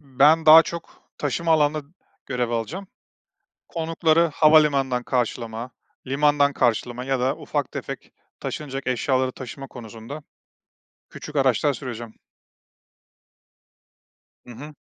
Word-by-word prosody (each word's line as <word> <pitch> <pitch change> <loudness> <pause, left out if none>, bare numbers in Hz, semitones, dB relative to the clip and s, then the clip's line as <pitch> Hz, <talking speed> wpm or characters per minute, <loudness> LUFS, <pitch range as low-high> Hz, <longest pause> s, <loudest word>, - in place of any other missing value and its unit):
ben 150 +3 +3
daha 160 +1 +10
çok 170 0 -9 0.2
taşıma 155 +4 0
alanında 150 -1 +2 0.4
görev 125 -2 -2
alacağım. 130 - -4 0.8
Konukları 165 0 +1
havalimanından 140 -5 +4
karşılama, 120 -1 -3 0.4
limandan 145 +1 +2
karşılama 120 0 0
ya 135 -1 0
da 130 +2 0
ufak - - -3
tefek - - -7 0.3
taşınacak 135 -3 -5
eşyaları 130 +1 0
taşıma 135 +2 -9
konusunda 120 +5 -10 0.9
küçük 150 -1 -9
araçlar 135 +1 +2
süreceğim. 120 -3 -7 2.3
Hı - - -15
hı. 145 +6 -10
135 Hz, 100 wpm, -23 LUFS, 125-155 Hz, 2.3 s, daha